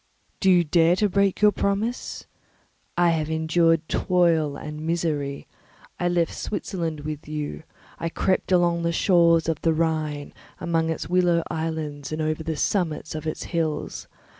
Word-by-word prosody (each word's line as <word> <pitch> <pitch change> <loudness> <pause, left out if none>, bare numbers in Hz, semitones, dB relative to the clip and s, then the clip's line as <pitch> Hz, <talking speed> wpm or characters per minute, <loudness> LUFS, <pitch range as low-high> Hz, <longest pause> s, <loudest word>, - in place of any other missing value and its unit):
Do 190 - +3
you 180 -2 +6
dare 165 +2 +4
to 210 +3 +2
break 200 0 +1
your 210 - +7
promise? 205 +5 -2 0.7
I 175 -1 +4
have 155 -2 -1
endured 160 0 +2
toil 165 -5 +2
and 150 0 -7
misery; 155 -4 -2 0.5
I 175 - +1
left 175 -2 +1
Switzerland 165 -7 -3
with 150 0 -6
you; 150 - -4 0.4
I 165 - -2
crept 185 +3 0
along 175 -2 +3
the 170 0 0
shores 170 -2 +4
of 160 -2 -1
the 165 -1 +2
Rhine, 155 -3 -1 0.3
among 165 -1 0
its 160 - -3
willow 175 -2 +3
islands 155 -3 -4
and 155 - -3
over 155 0 -1
the 160 0 -3
summits 165 -5 -1
of 155 0 -5
its 155 - -3
hills. 160 -3 -2
165 Hz, 155 wpm, -24 LUFS, 155-175 Hz, 0.7 s, your